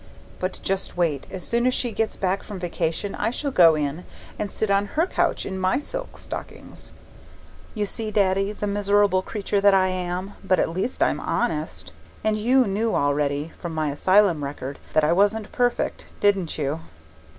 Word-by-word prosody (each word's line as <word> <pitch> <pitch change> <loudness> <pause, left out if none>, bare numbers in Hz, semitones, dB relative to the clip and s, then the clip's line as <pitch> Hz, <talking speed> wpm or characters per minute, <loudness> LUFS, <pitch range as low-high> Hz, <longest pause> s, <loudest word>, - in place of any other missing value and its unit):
But 185 +1 -3
just 195 -2 -2
wait 160 -6 0
as 185 - -7
soon 235 +1 +2
as 255 - +2
she 245 - -1
gets 225 0 -1
back 190 0 0
from 205 -3 -8
vacation 175 +2 -2
I - - 0
shall 280 +4 -3
go 165 -7 +7
in 150 +3 -2 0.4
and 205 - -2
sit 220 -2 -1
on 200 +1 +2
her 325 - +4
couch - - 0
in 190 -1 -4
my 185 0 +2
silk - - -6
stockings. - - -9 0.8
You 210 -1 0
see, 220 +2 -4
Daddy, 195 -1 +2
the 210 - -4
miserable 200 -1 +3
creature 200 0 -2
that 200 -1 +6
I 190 -1 +4
am 185 +1 -3
but 190 -1 +3
at - - +1
least 185 +9 -1
I'm - - +1
honest; - - -2 0.3
and 215 0 +2
you 250 +5 +3
knew 215 +3 0
already, 145 +2 0
from 170 -2 -5
my 155 -2 0
asylum 185 +1 +3
record, 140 0 -5
that 155 - +4
I 155 +3 +4
wasn't 205 +3 +2
perfect, 245 -1 0
didn't 200 -5 +2
you? 150 +1 -1
195 Hz, 180 wpm, -24 LUFS, 170-210 Hz, 0.8 s, go